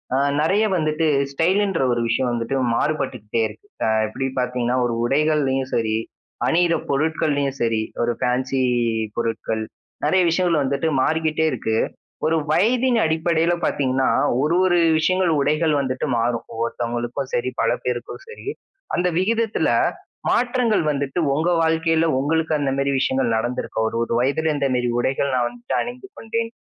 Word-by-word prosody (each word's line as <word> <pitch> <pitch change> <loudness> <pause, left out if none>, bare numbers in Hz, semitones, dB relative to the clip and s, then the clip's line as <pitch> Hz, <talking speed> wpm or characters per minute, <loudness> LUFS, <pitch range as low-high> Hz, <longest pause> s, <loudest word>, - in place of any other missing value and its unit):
அ - - +2 0.2
நறைய 195 +8 +2
வந்துட்டு 155 0 0 0.3
ஸ்டைல்ன்ற 185 +3 +1
ஒரு 120 - -1
விஷயம் 125 +2 +1
வந்துட்டு 120 +3 -2 0.2
மாறுபட்டுக்கிட்டே 125 -7 -1
இருக்கு. 105 - -15 0.2
அ - - +2 0.2
எப்பிடி 135 +5 -3
பாத்தீங்கன்னா 125 0 0
ஒரு 120 - -1
உடைகள்லயும் 135 -2 +1
சரி 110 -1 +1 0.5
அணியிற 170 +1 +3 0.2
பொருட்கள்லயும் 145 -1 0
சரி, 115 -1 +1 0.2
ஒரு 120 0 +1
பேன்சி 130 +2 0 0.6
பொருட்கள் 110 -1 -2 0.4
நறைய 190 - +3
விஷயங்கள் 170 -2 +2
வந்துட்டு 140 +3 -1
மாறிக்கிட்டே 160 +1 +1
இருக்கு. 110 -2 -1 0.5
ஒரு 160 - +2 0.2
வயதின் 240 +7 +3
அடிப்படையில 160 +1 +1
பார்த்தீங்கன்னா, 130 -1 +1 0.3
ஒரு 155 +4 +1
ஒரு 175 -1 +3 0.2
விஷயங்கள் 185 +2 +2
உடைகள் 150 +2 +2
வந்துட்டு 130 -2 -2
மாறும். 115 0 0
ஒவ்வொருத்தவங்களுக்கும் 120 +3 -3
சரி, 120 +1 0
பல 115 - +2
பேருக்கும் 125 - -4
சரி. 460 - -11 0.5
அந்த 180 +1 +1
விகிதத்தில 225 +3 +1 0.6
மாற்றங்கள் 245 -5 +2
வந்துட்டு 140 +3 -2
உங்க 160 +5 +1
வாழ்க்கையில 160 0 +2
உங்களுக்கு 160 +3 0
அந்த 140 -2 0
மாதிரி 140 0 +1
விஷயங்கள் 130 -3 +1
நடந்திருக்கும். 110 -1 -2
ஒரு 115 - -4
ஒரு 115 - -3
வயதில 150 +5 +1
இந்த 140 -1 0
மாரி 125 0 0
உடைகள் 135 +2 0
நான் 120 -1 +1
வந்து 245 0 -5
அணிந்து 245 +9 -7
கொண்டேன். 230 0 -3
140 Hz, 140 wpm, -22 LUFS, 125-165 Hz, 0.6 s, அணியிற